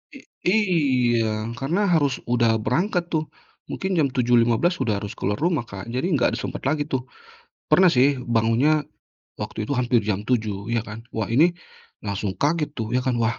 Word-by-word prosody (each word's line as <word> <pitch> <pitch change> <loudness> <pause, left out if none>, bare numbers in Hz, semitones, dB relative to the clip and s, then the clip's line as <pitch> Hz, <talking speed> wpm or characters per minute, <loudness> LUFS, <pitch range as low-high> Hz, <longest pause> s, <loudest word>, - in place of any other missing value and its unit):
I 270 - -13 1.0
iya, 110 0 -2
karena 170 +10 0
harus 145 -5 +1
udah 120 -2 +2
berangkat 175 - 0
tuh, 155 -1 -1 0.4
mungkin 190 - -3
jam 145 - +4
7.15 120 +6 +2
udah 105 -2 -1
harus 100 - -5
keluar 105 +2 0
rumah, 150 -2 -1
Kak, 100 -2 -8
jadi 130 +8 -1
nggak 125 - +2
ada - - -3
sempet - - -5
lagi 145 +2 0
tuh. 130 -3 -2 0.7
Pernah 185 -2 +5
sih 135 +3 +4
bangunnya 120 +5 +2 0.6
waktu 110 - -4
itu 125 - -3
hampir 120 -4 +1
jam 105 -2 -1
7.00 110 -4 -1
ya 115 -2 0
kan, 105 +1 -8 0.2
wah 110 - 0
ini 150 +9 +6 0.6
langsung 100 -1 -3
kaget 150 0 0
tuh 115 -1 -4
ya 125 - +2
kan, 125 -1 -1
wah 115 0 +1
125 Hz, 175 wpm, -23 LUFS, 110-150 Hz, 1.0 s, ini